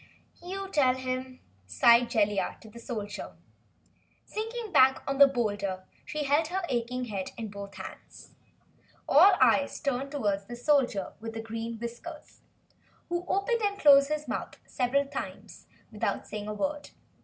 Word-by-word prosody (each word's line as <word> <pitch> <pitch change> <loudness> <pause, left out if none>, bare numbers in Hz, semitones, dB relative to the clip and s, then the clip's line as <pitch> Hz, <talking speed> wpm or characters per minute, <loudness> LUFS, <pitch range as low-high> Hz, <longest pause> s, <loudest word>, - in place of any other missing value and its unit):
"You 385 +3 -5
tell 260 -6 +3
him," 255 0 -5 0.3
sighed 235 - +5
Jellia 210 -4 0
to 220 - -13
the 235 - -11
Soldier. 220 -4 -6 0.9
Sinking 450 0 -5
back 265 -5 +5
on 275 0 -2
the 280 - +10
boulder 205 -7 -2 0.2
she 300 0 -3
held 290 +3 +2
her 375 +3 -2
aching 250 0 -2
head 200 -5 -4
in 225 -2 -5
both 200 0 -9
hands. - - -11 0.7
All 365 +8 +7
eyes 260 +3 +3
turned 275 -1 -2
toward 205 -8 -1
the 240 - -7
Soldier 245 -6 +1
with 225 0 -6
Green 225 +1 -5
Whiskers 240 +8 -9 0.7
who 350 +1 -2
opened 455 +4 0
and 405 -1 0
closed 280 -4 +6
his 305 0 -2
mouth - - -4
several 265 +3 0
times 280 - -8 0.2
without - - -2
saying 210 -1 -6
a 210 - -3
word. 290 +6 -3
255 Hz, 145 wpm, -29 LUFS, 225-295 Hz, 0.9 s, the